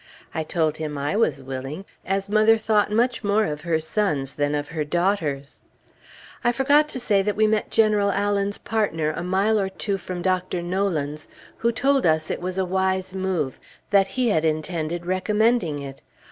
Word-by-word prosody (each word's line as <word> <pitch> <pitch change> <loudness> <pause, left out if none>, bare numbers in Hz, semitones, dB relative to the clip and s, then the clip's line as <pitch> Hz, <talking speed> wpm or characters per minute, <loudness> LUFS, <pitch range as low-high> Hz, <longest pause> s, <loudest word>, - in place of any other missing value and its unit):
I 160 - -1
told 155 -1 0
him 150 -2 -4
I 145 +6 -1
was 145 -11 +1
willing, 135 +7 -6 0.2
as 195 +1 -1
mother 215 +2 +4
thought 215 -1 +1
much 235 +3 +1
more 210 +1 +2
of 150 -4 -4
her 165 -1 0
sons 155 -5 -1
than 145 0 0
of 145 0 -3
her 160 -2 -2
daughters. 155 -4 -1 0.8
I 240 - +4
forgot 285 +5 +3
to 260 - -3
say 205 -5 +2
that 205 +1 -1
we 215 - +3
met 215 0 +1
General 210 -2 +3
Allen's 200 0 0
partner 165 -9 -1
a - - -4
mile 195 +5 +2
or 195 -1 0
two 195 +1 -3
from 180 -1 -6
Dr. 185 -1 0
Nolan's, 170 -5 -2 0.3
who 235 - +1
told 270 0 +2
us 155 0 +1
it - - -3
was 185 +1 -3
a 190 - +1
wise 190 0 0
move; 185 -8 -2 0.3
that 200 -1 +5
he 250 -2 +2
had 160 -7 +2
intended 160 +1 -2
recommending 200 -2 +1
it. 135 -1 -8
190 Hz, 180 wpm, -23 LUFS, 155-210 Hz, 0.8 s, that